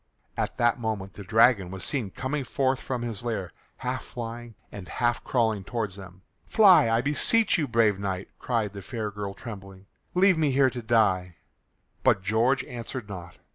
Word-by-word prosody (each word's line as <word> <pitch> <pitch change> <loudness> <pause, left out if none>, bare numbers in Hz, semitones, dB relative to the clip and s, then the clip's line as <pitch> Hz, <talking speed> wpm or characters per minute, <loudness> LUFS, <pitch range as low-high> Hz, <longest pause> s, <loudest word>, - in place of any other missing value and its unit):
At - - -3
that 120 +1 +2
moment 105 -4 -3
the 100 - -9
dragon 110 -2 +4
was 95 0 -7
seen 125 -8 -2
coming 135 +7 -3
forth 130 +1 0
from 125 -3 -4
his 115 -3 -4
lair 105 -7 -3 0.3
half - - -3
flying 120 -1 -7 0.2
and 100 -3 -9
half 120 -1 0
crawling 110 -5 0
towards 105 -3 -3
them. 95 -1 -12 0.2
"Fly, 190 - +6
I 115 +1 +2
beseech 175 - +3
you, 150 - 0
brave 110 -4 +2
knight," 95 -1 -3
cried 115 -5 -1
the 100 - -7
fair 110 -1 -4
girl 100 -1 -5
trembling, 95 -4 -10 0.3
"Leave 185 -2 +4
me 155 -2 +3
here 135 -1 +3
to 125 - -6
die." 100 -6 +2 0.7
But 95 - +3
George 115 +6 +2
answered 120 -1 -7
not. 90 -3 -8
115 Hz, 175 wpm, -26 LUFS, 100-125 Hz, 0.7 s, Fly